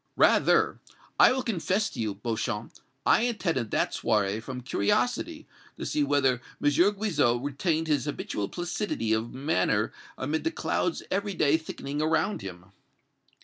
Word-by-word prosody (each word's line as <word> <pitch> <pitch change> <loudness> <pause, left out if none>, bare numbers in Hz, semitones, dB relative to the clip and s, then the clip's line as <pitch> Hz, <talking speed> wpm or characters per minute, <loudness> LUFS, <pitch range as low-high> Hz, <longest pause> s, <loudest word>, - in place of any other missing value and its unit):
"Rather. - - +4 0.4
I - - +8
will 260 0 0
confess 205 0 0
to - - -9
you, 110 -3 -1
Beauchamp, 110 +1 -3 0.3
I - - +5
attended 180 - -1
that - - 0
soirée 105 0 +1
from 125 +2 -6
curiosity 100 -5 0 0.3
to - - -5
see 150 - +1
whether 135 -3 +2 0.2
M. 145 - +3
Guizot 185 - +2
retained 155 +3 0
his 150 -2 +1
habitual 105 -8 -3
placidity 175 - -2
of 110 +2 -1
manner 130 -8 0 0.2
amid 150 +4 -2
the - - +1
clouds 330 0 -1
every 200 +1 -1
day 150 -2 +3
thickening 150 -2 -4
around 160 +6 +1
him." 90 0 -9
145 Hz, 145 wpm, -28 LUFS, 115-175 Hz, 0.4 s, I